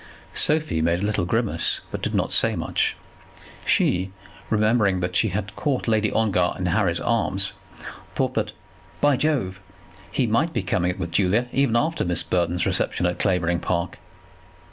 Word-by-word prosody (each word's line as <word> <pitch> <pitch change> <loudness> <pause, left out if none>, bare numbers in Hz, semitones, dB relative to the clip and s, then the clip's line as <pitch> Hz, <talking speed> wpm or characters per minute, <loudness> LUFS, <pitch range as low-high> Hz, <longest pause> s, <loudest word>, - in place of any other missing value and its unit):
Sophie 150 - +2
made 85 +3 +1
a - - +1
little 105 -4 0
grimace, 100 -4 +1
but - - -5
did - - -2
not - - 0
say - - +3
much. - - -1 0.7
She, 90 +2 +2 0.4
remembering 110 -3 +2
that 90 0 -2
she 110 - +4
had 100 0 -4
caught 140 -5 -1
Lady 110 -1 +2
Ongar 95 -5 +1
in 90 - -3
Harry's 90 -1 +1
arms, 100 -4 0 0.6
thought - - 0
that, - - -1 0.5
"by 145 -1 +4
Jove," 125 -11 -1 0.5
he 125 +4 +1
might 115 +9 +1
be 115 -7 -1
coming 90 -1 0
it 90 - -3
with 85 -2 -4
Julia, 105 +7 +2
even 135 -3 +1
after 160 +7 +1
Miss 90 -1 +1
Burton's 90 0 0
reception 90 - +1
at 90 0 -1
Clavering 90 -3 +1
Park. 85 0 -2
95 Hz, 165 wpm, -23 LUFS, 90-115 Hz, 0.7 s, she